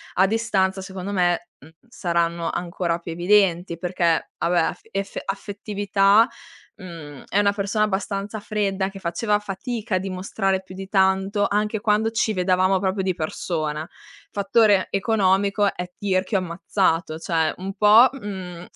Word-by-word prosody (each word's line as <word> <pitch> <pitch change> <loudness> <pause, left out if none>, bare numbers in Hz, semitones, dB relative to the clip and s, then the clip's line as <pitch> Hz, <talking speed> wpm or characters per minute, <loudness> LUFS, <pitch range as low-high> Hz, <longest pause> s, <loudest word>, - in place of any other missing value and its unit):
a 190 +1 +4
distanza 195 -3 0
secondo 190 +1 -6
me, 175 -2 +1
mhmm, 145 - -15 0.2
saranno 170 -5 -1
ancora 170 -1 -2
più 170 -1 -7
evidenti, 175 -1 +2
perché 170 -1 0
vabbè 175 +1 +1
af 165 - -1
effe 195 -1 -3
affettività, 205 +1 +2 0.5
mhmm, 165 -8 -10
è 200 - +2
una 200 0 +3
persona 205 +1 0
abbastanza 200 +1 -3
fredda, 200 -2 -1
che 195 0 -10
faceva 205 +4 0
fatica 210 +2 -4
a - - +4
dimostrare 190 0 -2
più 185 0 -12
di 195 0 -8
tanto, 195 +1 +2
anche 210 +1 0
quando 215 +1 +1
ci 220 0 0
vedevamo 185 0 +2
proprio 190 0 -1
di 185 -1 0
persona. 155 -2 -3 0.4
Fattore 205 -1 +3
economico: 200 -1 +2
è 180 0 -5
tirchio 190 0 0
ammazzato, 170 -2 -1
cioè 165 -2 0
un 190 +2 -5
po', 210 +5 +7
mhmm, 190 -8 -7
190 Hz, 140 wpm, -23 LUFS, 180-205 Hz, 0.5 s, po